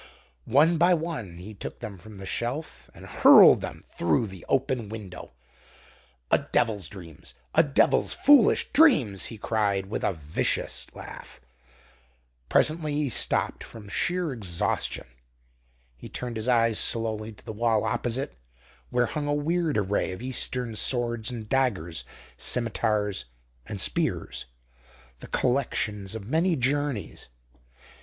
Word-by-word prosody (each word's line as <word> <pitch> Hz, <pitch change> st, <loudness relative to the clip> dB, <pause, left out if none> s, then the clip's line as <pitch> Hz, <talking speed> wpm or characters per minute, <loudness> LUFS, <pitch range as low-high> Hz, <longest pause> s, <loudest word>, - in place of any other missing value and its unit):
One 155 Hz, +6 st, +4 dB
by 175 Hz, +1 st, +5 dB
one 155 Hz, -, -5 dB
he 95 Hz, +5 st, -9 dB
took 100 Hz, -, -7 dB
them 100 Hz, -3 st, -8 dB
from 105 Hz, +3 st, -12 dB
the 95 Hz, -, -8 dB
shelf 120 Hz, -, -4 dB
and -, -, -12 dB
hurled -, -, +7 dB
them -, -, -7 dB
through 85 Hz, +7 st, 0 dB
the 95 Hz, -4 st, -10 dB
open 130 Hz, -5 st, 0 dB
window. 100 Hz, -, -9 dB, 1.0 s
"A -, -, +5 dB
devil's 105 Hz, -4 st, 0 dB
dreams! 85 Hz, -5 st, -12 dB, 0.2 s
A 160 Hz, -, +6 dB
devil's 145 Hz, -4 st, +2 dB
foolish 285 Hz, -6 st, +4 dB
dreams!" 150 Hz, -, +4 dB
he 115 Hz, -, -7 dB
cried, 100 Hz, -3 st, 0 dB
with -, -, -3 dB
a -, -, +2 dB
vicious 75 Hz, -2 st, -2 dB
laugh. -, -, -10 dB, 1.1 s
Presently 155 Hz, -1 st, +2 dB
he 145 Hz, -2 st, 0 dB
stopped -, -, 0 dB
from 110 Hz, -3 st, -11 dB
sheer 175 Hz, -, -1 dB
exhaustion. 95 Hz, -8 st, -2 dB, 0.9 s
He -, -, -11 dB
turned 125 Hz, -1 st, -5 dB
his 110 Hz, +2 st, -4 dB
eyes 115 Hz, -3 st, +3 dB
slowly 110 Hz, -1 st, -1 dB
to -, -, -18 dB
the -, -, -6 dB
wall 110 Hz, 0 st, +1 dB
opposite, 130 Hz, +4 st, -2 dB, 0.6 s
where 125 Hz, 0 st, +2 dB
hung 145 Hz, +3 st, -4 dB
a 145 Hz, -, +1 dB
weird 160 Hz, 0 st, 0 dB
array 100 Hz, -1 st, 0 dB
of 95 Hz, -, -9 dB
Eastern 125 Hz, -2 st, -1 dB
swords 120 Hz, +1 st, 0 dB
and 115 Hz, -4 st, -6 dB
daggers, 120 Hz, -, 0 dB, 0.3 s
scimitars 105 Hz, -, 0 dB, 0.4 s
and -, -, -5 dB
spears, -, -, 0 dB, 0.7 s
the -, -, -9 dB
collections 105 Hz, -6 st, -1 dB
of 105 Hz, -3 st, -6 dB
many 165 Hz, +6 st, +2 dB
journeys. 135 Hz, -, -2 dB
115 Hz, 135 wpm, -26 LUFS, 105-140 Hz, 1.1 s, hurled